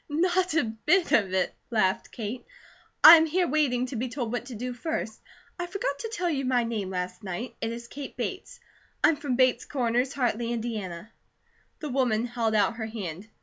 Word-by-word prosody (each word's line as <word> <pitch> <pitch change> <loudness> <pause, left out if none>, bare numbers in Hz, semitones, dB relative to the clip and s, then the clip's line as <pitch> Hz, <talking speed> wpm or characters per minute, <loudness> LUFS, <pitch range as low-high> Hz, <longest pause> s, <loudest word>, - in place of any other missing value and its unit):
"Not 355 +3 +1
a 320 - +4
bit 300 - +1
of 200 -5 +3
it!" 185 -1 0 0.2
laughed 215 -2 +1
Kate. 230 +1 -5 0.6
"I 335 - +13
am 320 0 +3
here 355 +3 +1
waiting 260 -4 +1
to 255 - -6
be 245 +2 -2
told 240 -3 -3
what 245 0 -3
to 250 - -7
do 250 +3 -4
first. 245 -4 -4 0.4
I 350 - -2
forgot 345 -7 -3
to 455 - -4
tell 360 -5 -1
you 285 -5 0
my 255 -2 +2
name 220 -5 -3
last 180 +1 -4
night. 195 +6 -5
It 225 - -1
is 235 0 -7
Kate 275 +2 -8
Bates. - - -5 0.4
I'm 325 - +5
from 285 -3 -2
Bates 255 -1 +3
Corners, 250 -1 0
Hartley, 240 -3 -1
Indiana." 220 -5 -4 0.7
The 300 - -4
woman 245 -4 +1
held 235 -2 -1
out 210 +2 +2
her 220 -2 -3
hand. 195 -4 -6
245 Hz, 190 wpm, -27 LUFS, 220-290 Hz, 0.7 s, I